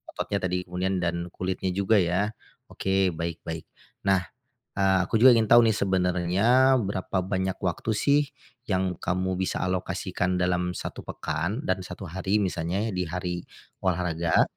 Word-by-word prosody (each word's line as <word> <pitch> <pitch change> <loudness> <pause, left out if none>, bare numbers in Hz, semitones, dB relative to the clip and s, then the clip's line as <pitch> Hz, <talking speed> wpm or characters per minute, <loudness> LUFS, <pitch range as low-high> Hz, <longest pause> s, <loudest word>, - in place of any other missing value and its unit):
ototnya 100 - -2
tadi 90 0 -1
kemudian 90 +1 -1
dan 85 0 -1
kulitnya 95 0 -2
juga 100 +2 +3
ya. 90 +4 +1 0.4
Oke, 95 -1 +1
baik 85 0 -4
baik. 80 -1 -5 0.4
Nah, 95 -2 +4 0.6
eee, 95 -1 +3
aku 110 - +1
juga 130 0 +9
ingin 110 -2 +3
tahu 120 0 +8
nih 110 - +3
sebenarnya 95 +7 +3
berapa 95 -1 -2
banyak 95 -1 -1
waktu 95 +4 -1
sih 145 +6 +3 0.5
yang 95 -3 0
kamu 95 +1 -1
bisa 95 - -1
alokasikan 90 0 -1
dalam 90 0 0
1 - - -6
pekan 85 - -3
dan 95 0 0
1 90 +2 -8
hari, 95 +4 0
misalnya 95 +4 -1
ya - - -3
di 90 0 -1
hari 90 +1 -3 0.5
olahraga, 85 -2 +2
95 Hz, 150 wpm, -26 LUFS, 90-100 Hz, 0.6 s, juga